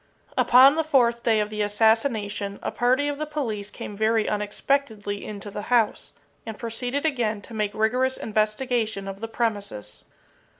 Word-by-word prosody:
Upon 260 +3 +7
the 320 +1 0
fourth 240 -6 +2
day 225 -2 +2
of 210 0 -1
the 215 0 -3
assassination, 210 -1 +1
a - - -2
party 255 +4 +2
of 290 0 -3
the 305 - -3
police 225 -10 -3
came 210 - -8
very 220 +1 +1
unexpectedly 210 0 -1
into 205 -1 -7
the 205 - -5
house, 235 -3 +1 0.3
and 220 -2 -7
proceeded 245 +5 -3
again 235 -8 0
to - - -10
make 210 -2 -2
rigorous 250 +4 +1
investigation 215 -1 -1
of 195 +1 -7
the 225 - -3
premises. 205 - -3
220 Hz, 160 wpm, -25 LUFS, 210-250 Hz, 0.3 s, Upon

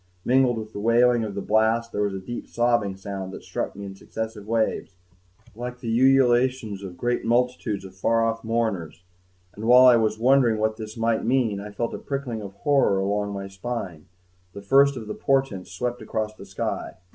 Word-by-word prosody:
Mingled 125 -2 +3
with 110 -1 -7
the - - -5
wailing 120 +2 +3
of 105 -2 -5
the 100 - -3
blast, 110 +2 +2
there 105 - -2
was 100 -1 0
a - - -4
deep 120 +6 -7
sobbing 120 -5 +1
sound 95 -1 -6
that - - -9
struck - - -4
me 100 0 -7
in 95 - -7
successive 105 +1 -6
waves, 110 -4 -1 0.6
like 125 +1 -6
the 115 -2 -2
ululations 125 -4 +3
of 90 -3 -8
great 120 0 -1
multitudes 120 -4 0
of 95 - -11
far 115 +4 +1
off 115 0 -2
mourners. 110 -8 -2 0.5
And 110 - -7
while 125 +2 +8
I 125 -2 +8
was 110 -1 +1
wondering 125 -1 +4
what 110 0 0
this 110 0 -8
might 115 0 +1
mean 115 -4 +1
and 105 0 -9
felt 115 +2 -2
a - - -5
prickling 135 -5 -4
of 100 -2 -8
horror 140 -9 +3
along 100 +1 -1
my 100 -1 -5
spine, 95 -5 -6 0.5
the 100 - -9
first 140 +5 +4
of 115 - -6
the 105 - -5
portents 135 -9 -1
swept 120 +6 -3
across 110 0 -3
the 100 -2 -13
sky. 95 - -4
110 Hz, 195 wpm, -24 LUFS, 100-120 Hz, 0.6 s, while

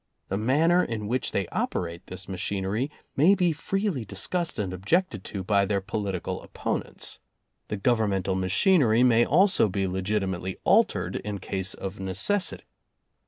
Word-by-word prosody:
The 95 - -1
manner 160 +10 +3
in 110 -3 -4
which 125 +3 -1
they 95 -3 -1
operate 85 +1 -3
this 95 0 -7
machinery 100 +6 -2 0.3
may 170 +8 +5
be 180 -3 +2
freely 185 - -2
dis 100 -2 -5
cussed 175 -2 -2
and 95 -3 -2
objected 105 - 0
to 100 -2 -5
by 100 +1 +3
their 100 0 0
political 100 -1 -3
oppon - - -3
ents. - - -7 0.5
The 105 - -3
Governmental 100 -4 +1
machinery 115 - +3
may 120 -1 +4
also 185 - +4
be 95 +1 -1
legitimately 95 -1 -2
altered, - - +2
in 105 -1 -4
case 95 -1 -2
of 95 +1 -6
necessity. 100 - +1
105 Hz, 150 wpm, -26 LUFS, 95-135 Hz, 0.5 s, may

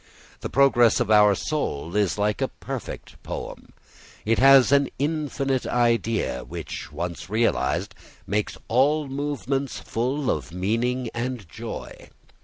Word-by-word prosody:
The - - -5
progress 125 -4 +4
of 110 - 0
our 105 -1 +6
soul 85 - -3
is 105 -2 +1
like 105 0 0
a - - +2
perfect - - -8
poem. - - -7 0.5
It 115 +1 +2
has 135 0 +7
an 140 -1 +4
infinite 140 -3 -1
idea 115 - +1
which - - -7
once 85 +4 -5
realised 115 +3 0 0.3
makes 105 +1 -2
all 145 +5 +2
movements 135 -1 -3
full 130 +4 -1
of - - -4
meaning 115 +7 -1
and 120 -4 -4
joy. 70 - -8
120 Hz, 125 wpm, -24 LUFS, 105-135 Hz, 0.5 s, has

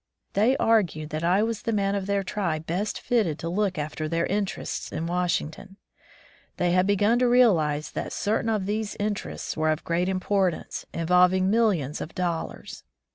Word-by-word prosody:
They 230 +7 +3
argued 175 -9 +1
that 155 +2 -3
I 185 +5 +3
was 225 -1 -2
the 230 - -2
man 200 -2 +1
of 200 -1 -2
their 200 -1 0
tribe 170 -5 -2
best 190 +6 -2
fitted 210 -11 0
to 165 - -5
look 190 0 0
after 155 +1 -3
their 165 +1 0
interests 200 0 -3
at 160 - -3
Washington. 175 +1 -2 0.8
They 175 -1 +1
had 185 +1 +3
begun 205 +4 +3
to 250 - +3
realize 170 -12 +3
that - - -4
certain 220 +2 0
of 210 -4 0
these 210 +1 -2
interests 205 -1 -3
were 155 0 +1
of 155 +1 -1
great 175 +2 0
importance, 190 -1 -1
involving 180 +3 +3
millions 195 - +1
of 160 - -7
dollars. 175 -3 -4
185 Hz, 170 wpm, -26 LUFS, 165-210 Hz, 0.8 s, They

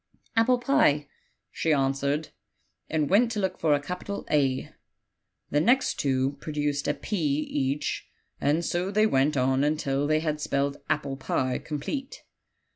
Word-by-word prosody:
'Apple 240 +2 +4
pie/ 150 - +3 0.4
she 160 - 0
answered, 140 +2 +1 0.6
and 155 -2 +1
went 230 - +4
to 215 - -2
look 190 -2 -1
for 155 -3 +3
a - - 0
capital 180 +7 -5
'A;' 135 -3 +1 0.8
the 145 - +3
next 255 +8 +2
two 135 0 0
produced 145 -2 -2
a 145 - +1
'p' - - -8
each, 145 -3 -1 0.3
and 155 +4 +1
so 175 +2 -1
they 215 +2 +3
went 145 -6 +2
on 130 +1 +2
until 145 -2 0
they 155 +1 +3
had 155 -1 -2
spelled 140 0 0
'Apple 145 -3 -1
pie' 130 -1 -1
complete. 210 - -5
150 Hz, 145 wpm, -27 LUFS, 140-175 Hz, 0.8 s, Apple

